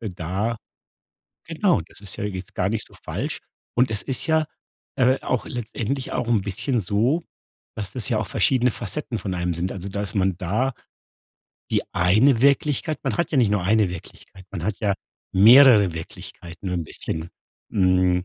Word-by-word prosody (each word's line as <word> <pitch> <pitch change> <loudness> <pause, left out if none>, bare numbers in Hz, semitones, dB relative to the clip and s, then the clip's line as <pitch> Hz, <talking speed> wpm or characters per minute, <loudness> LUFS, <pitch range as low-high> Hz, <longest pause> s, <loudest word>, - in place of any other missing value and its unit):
äh, 115 - -4
da 95 +6 -2 0.9
genau, 165 - +1
das - - -14
ist 100 -4 -7
ja - - -5
jetzt 95 -3 -5
gar 95 - +1
nicht 110 0 -2
so - - -21
falsch. - - -3 0.4
Und 125 -1 +3
es 105 - 0
ist 135 -2 -3
ja, 160 -1 +3 0.5
äh, 130 +1 +3
auch 125 -6 -1
letztendlich 120 +2 -4
auch 120 - -1
'n 115 -4 +3
bisschen 105 +6 -1
so, 115 - +1 0.5
dass 105 -3 -4
das 125 -4 -3
ja 115 - +1
auch 105 - -3
verschiedene 125 +5 +2
Facetten 125 -1 -4
von 95 - -3
einem 90 -1 -1
sind. 85 +3 -2
Also, 95 0 -6
dass 100 +2 -4
man 95 -3 +1
da 105 +9 0 1.0
die - - +2
eine 110 +9 +4
Wirklichkeit 145 +2 +2
man - - -1
hat 170 - 0
ja 145 - +3
nicht 115 -5 +4
nur 105 -3 +1
eine 105 0 +3
Wirklichkeit, 90 +2 -11
man 90 -5 -5
hat 105 0 -1
ja 100 -2 +1 0.4
mehrere 110 -1 +8
Wirklichkeiten 85 +2 -8
nur 90 - -1
'n 85 - -2
bisschen, 80 +2 -5 0.4
mhm, 90 -2 +2
105 Hz, 180 wpm, -23 LUFS, 95-125 Hz, 1.0 s, mehrere